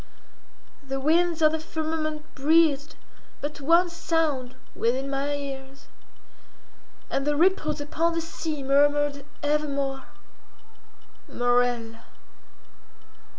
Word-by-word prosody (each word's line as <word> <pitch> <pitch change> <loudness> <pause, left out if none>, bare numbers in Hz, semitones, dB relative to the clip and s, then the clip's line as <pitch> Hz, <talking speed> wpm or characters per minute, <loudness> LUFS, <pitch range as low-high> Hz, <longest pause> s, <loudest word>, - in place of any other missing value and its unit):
The 270 -1 -4
winds 330 +3 +2
of 310 - +6
the 320 - -2
firmament 310 -1 -4
breathed 300 0 +3 0.4
but 295 0 -5
one 335 +5 +4
sound 310 -7 -1 0.2
within 255 +4 0
my 280 +1 -1
ears, 275 -1 -8 1.2
and 275 - 0
the 295 +1 +1
ripples 315 -2 +2
upon 330 +3 0
the 330 - 0
sea 320 -3 -5
murmured 285 +1 +2 0.2
evermore—Morella. 245 -4 -3
290 Hz, 90 wpm, -26 LUFS, 270-315 Hz, 1.2 s, of